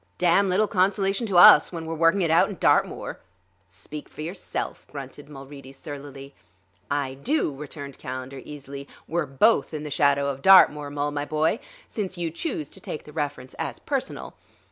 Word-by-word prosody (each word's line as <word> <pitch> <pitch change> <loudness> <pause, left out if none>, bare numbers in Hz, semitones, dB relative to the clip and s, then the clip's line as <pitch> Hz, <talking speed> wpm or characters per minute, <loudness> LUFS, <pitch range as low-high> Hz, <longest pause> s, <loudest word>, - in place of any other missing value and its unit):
"Damn 180 +3 +3
little 195 +4 +3
consolation 195 +3 +1
to 190 -4 +1
us 160 -3 +9
when 165 -2 -6
we're 165 - -4
working 165 +4 +3
it 165 - +1
out 165 - +4
in - - -6
Dartmoor." - - +1 0.5
"Speak 100 +11 -10
for - - -10
yourself," 175 +4 -5
grunted 140 +1 -9
Mulready 135 -1 -11
surlily. 140 -1 -9 0.6
"I 140 -2 -1
do," 150 - -1
returned 140 -1 -9
Calendar 130 +1 -6
easily; 140 -1 -9 0.2
"we're 165 -1 -1
both 160 +5 +2
in 150 - -5
the 150 - -6
shadow 140 0 +2
of 135 -1 -5
Dartmoor, 150 -6 +6
Mul, 145 0 -2
my 145 0 -3
boy; 155 +8 0 0.3
since 190 -4 -5
you 170 -2 -2
choose 165 - -4
to - - -13
take 150 - -7
the 150 - -14
reference 145 -4 -4
as - - -3
personal. - - -4
150 Hz, 170 wpm, -25 LUFS, 140-175 Hz, 0.6 s, us